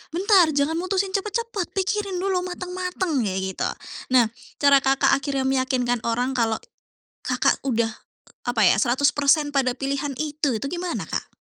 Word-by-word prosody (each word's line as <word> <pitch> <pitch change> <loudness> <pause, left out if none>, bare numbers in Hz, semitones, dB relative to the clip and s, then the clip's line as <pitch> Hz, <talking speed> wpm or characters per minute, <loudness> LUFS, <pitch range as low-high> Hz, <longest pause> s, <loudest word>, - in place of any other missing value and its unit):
"Bentar, 380 -2 +5
jangan 310 +4 +1
mutusin 380 +1 -1
cepat-cepat, 420 -1 -3
pikirin 390 0 -1
dulu 380 -2 +1
mateng-mateng," 360 -3 -3
kayak 190 0 -2
gitu. - - -1 0.5
Nah, 230 -3 +5 0.3
cara 280 -1 +6
Kakak 270 0 +2
akhirnya 275 -1 0
meyakinkan 255 -2 0
orang 245 +3 0
kalau 230 -3 +1 0.7
Kakak - - +1
udah, 230 -3 +1
e - - -17 0.4
apa 240 -3 +1
ya, 195 - +5
100% 285 +4 +2
pada 260 -3 +1
pilihan 275 +1 -2
itu 300 -3 -1
itu 275 - -4
gimana, 350 0 -3
Kak? - - -4
285 Hz, 145 wpm, -23 LUFS, 255-365 Hz, 0.7 s, cara